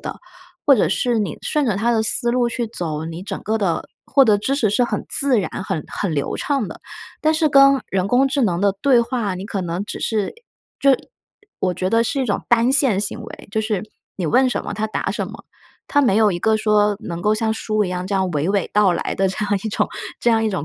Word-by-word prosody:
的。 -, -, -6 dB, 0.5 s
或 280 Hz, -2 st, +6 dB
者 -, -, +2 dB
是 240 Hz, -2 st, +1 dB
你 200 Hz, -7 st, -2 dB
顺 300 Hz, -2 st, 0 dB
着 220 Hz, -, +1 dB
它 225 Hz, +4 st, +1 dB
的 220 Hz, -2 st, +1 dB
思 240 Hz, +2 st, +1 dB
路 245 Hz, 0 st, +1 dB
去 235 Hz, -1 st, -3 dB
走， 160 Hz, -7 st, -4 dB
你 165 Hz, +1 st, -6 dB
整 -, -, -5 dB
个 220 Hz, +1 st, -1 dB
的， 190 Hz, -6 st, -1 dB, 0.2 s
获 275 Hz, -, +5 dB
得 210 Hz, -4 st, +4 dB
知 260 Hz, +7 st, -1 dB
识 230 Hz, -7 st, +1 dB
是 245 Hz, +4 st, +2 dB
很 -, -, -3 dB
自 270 Hz, -6 st, +3 dB
然、 185 Hz, -, -4 dB
很 175 Hz, -6 st, -3 dB
很 185 Hz, -6 st, -3 dB
流 140 Hz, -, -2 dB
畅 275 Hz, -8 st, -1 dB
的。 -, -, -10 dB, 0.4 s
但 310 Hz, +1 st, +2 dB
是 315 Hz, -1 st, +2 dB
跟 275 Hz, -2 st, +5 dB
人 190 Hz, 0 st, 0 dB
工 255 Hz, +5 st, +3 dB
智 270 Hz, 0 st, 0 dB
能 180 Hz, -6 st, +1 dB
的 200 Hz, 0 st, +3 dB
对 265 Hz, -4 st, +4 dB
话， 235 Hz, -5 st, -2 dB
你 185 Hz, +1 st, -6 dB
可 205 Hz, -1 st, -3 dB
能 175 Hz, +2 st, -3 dB
只 -, -, -6 dB
是， 215 Hz, -3 st, -1 dB
呃， -, -, -8 dB, 0.5 s
就 275 Hz, -, +4 dB
呃 -, -, +3 dB, 0.6 s
我 185 Hz, -1 st, 0 dB
觉 185 Hz, +2 st, -2 dB
得 230 Hz, +1 st, +3 dB
是 275 Hz, +4 st, -1 dB
一 -, -, +1 dB
种 205 Hz, -5 st, -1 dB
单 240 Hz, +1 st, +4 dB
线 265 Hz, -8 st, +3 dB
行 210 Hz, +3 st, -2 dB
为， 220 Hz, -, -11 dB
就 220 Hz, +1 st, 0 dB
是 215 Hz, -3 st, -2 dB, 0.3 s
你 185 Hz, -, -4 dB
问 255 Hz, -, +3 dB
什 245 Hz, -, -2 dB
么 -, -, -4 dB
它 220 Hz, -, -2 dB
答 215 Hz, -, -3 dB
什 -, -, -3 dB
么， -, -, -11 dB, 0.4 s
它 285 Hz, -, +3 dB
没 245 Hz, -9 st, +3 dB
有 215 Hz, -1 st, +4 dB
一 175 Hz, -, -2 dB
个 220 Hz, +4 st, +2 dB
说 210 Hz, -1 st, +2 dB
能 170 Hz, -6 st, -6 dB
够 210 Hz, +4 st, +2 dB
像 220 Hz, 0 st, 0 dB
书 215 Hz, -1 st, -1 dB
一 -, -, -3 dB
样 180 Hz, 0 st, -3 dB
这 200 Hz, -, -2 dB
样 190 Hz, -1 st, +1 dB
娓 155 Hz, 0 st, -1 dB
娓 200 Hz, 0 st, 0 dB
道 205 Hz, -3 st, +4 dB
来 170 Hz, -, -3 dB
的 195 Hz, -, +2 dB
这 190 Hz, +3 st, -2 dB
样 205 Hz, 0 st, 0 dB
一 220 Hz, -, -1 dB
种， -, -, 0 dB, 0.3 s
这 240 Hz, -, +3 dB
样 225 Hz, -1 st, +2 dB
一 -, -, +2 dB
种 190 Hz, -8 st, -3 dB
215 Hz, 275 characters per minute, -20 LUFS, 190-245 Hz, 0.6 s, 或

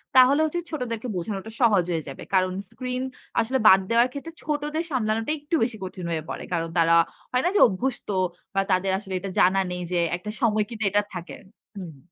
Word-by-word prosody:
তাহলে 260 Hz, +3 st, +7 dB
হচ্ছে 330 Hz, +3 st, -2 dB
ছোটদেরকে 250 Hz, -5 st, -3 dB
বোঝানোটা 195 Hz, +4 st, -4 dB
সহজ 205 Hz, -6 st, +5 dB
হয়ে 160 Hz, -3 st, -1 dB
যাবে। 135 Hz, -, -8 dB
কারণ 185 Hz, -1 st, +3 dB, 0.2 s
স্ক্রিন 250 Hz, 0 st, -4 dB, 0.4 s
আসলে 260 Hz, +4 st, 0 dB
বাদ 190 Hz, -2 st, +9 dB
দেওয়ার 235 Hz, +1 st, +4 dB
ক্ষেত্রে 295 Hz, +3 st, -7 dB
ছোটদের 300 Hz, +2 st, -1 dB
সামলানোটা 225 Hz, 0 st, 0 dB
একটু 295 Hz, +3 st, -2 dB
বেশি 225 Hz, -2 st, -2 dB
কঠিন 185 Hz, -1 st, -6 dB
হয়ে 160 Hz, -1 st, -2 dB
পড়ে। -, -, -5 dB
কারণ 165 Hz, -1 st, -1 dB
তারা 165 Hz, 0 st, +5 dB, 0.4 s
হয় 250 Hz, 0 st, +1 dB
না 355 Hz, -, +4 dB
যে -, -, +5 dB
অভ্যস্ত 245 Hz, +5 st, -3 dB, 0.5 s
বা 195 Hz, -, +4 dB
তাদের 185 Hz, +1 st, +2 dB
আসলে 195 Hz, -1 st, -7 dB
এটা 195 Hz, +2 st, -5 dB
জানা 190 Hz, +1 st, +5 dB
নেই 180 Hz, 0 st, -4 dB
যে 175 Hz, -, +1 dB, 0.2 s
একটা 210 Hz, +4 st, -6 dB
সময় 215 Hz, -3 st, +3 dB
কিন্তু 225 Hz, -2 st, -5 dB
এটা 205 Hz, -, +3 dB
থাকে। 175 Hz, -2 st, -7 dB, 0.4 s
হুম। 165 Hz, -7 st, -8 dB
215 Hz, 195 wpm, -25 LUFS, 185-255 Hz, 0.5 s, বাদ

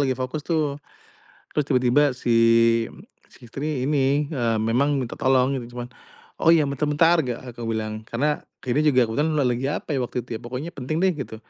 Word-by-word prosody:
lagi 130 Hz, -, +1 dB
fokus 130 Hz, +4 st, -3 dB
tuh, 155 Hz, -4 st, 0 dB, 0.8 s
terus 150 Hz, -, +2 dB
tiba-tiba 130 Hz, +2 st, +3 dB
si 125 Hz, -2 st, -2 dB, 1.0 s
si -, -, -18 dB
istri 140 Hz, +1 st, -3 dB
ini, 145 Hz, 0 st, +1 dB
eee, 115 Hz, -5 st, 0 dB
memang 125 Hz, +6 st, +1 dB
minta 120 Hz, -, -5 dB
tolong, 130 Hz, +1 st, +2 dB
gitu 120 Hz, 0 st, -10 dB
cuman, 120 Hz, 0 st, -6 dB, 0.5 s
“Oh 165 Hz, +1 st, +5 dB
ya, 155 Hz, -, +3 dB
bentar 140 Hz, +2 st, -1 dB
bentar.” 165 Hz, +3 st, +4 dB
Gak 120 Hz, -2 st, -3 dB, 0.2 s
aku 120 Hz, -, -5 dB
bilang. 110 Hz, 0 st, -4 dB
Karena, 150 Hz, +5 st, 0 dB, 0.3 s
ini 125 Hz, +4 st, +1 dB
juga 130 Hz, -4 st, +4 dB
aku 110 Hz, -, -4 dB
kan 150 Hz, -, +3 dB
la 150 Hz, -, +2 dB
lagi 125 Hz, +2 st, -1 dB
apa 150 Hz, -, -4 dB
ya -, -, 0 dB
waktu 125 Hz, 0 st, -3 dB
itu 115 Hz, -2 st, -5 dB
ya, -, -, -17 dB
pokoknya 130 Hz, +7 st, -5 dB
penting 155 Hz, +3 st, -3 dB
deh, 190 Hz, -, +5 dB
gitu. 125 Hz, -5 st, -6 dB
130 Hz, 200 wpm, -23 LUFS, 120-150 Hz, 1.0 s, Oh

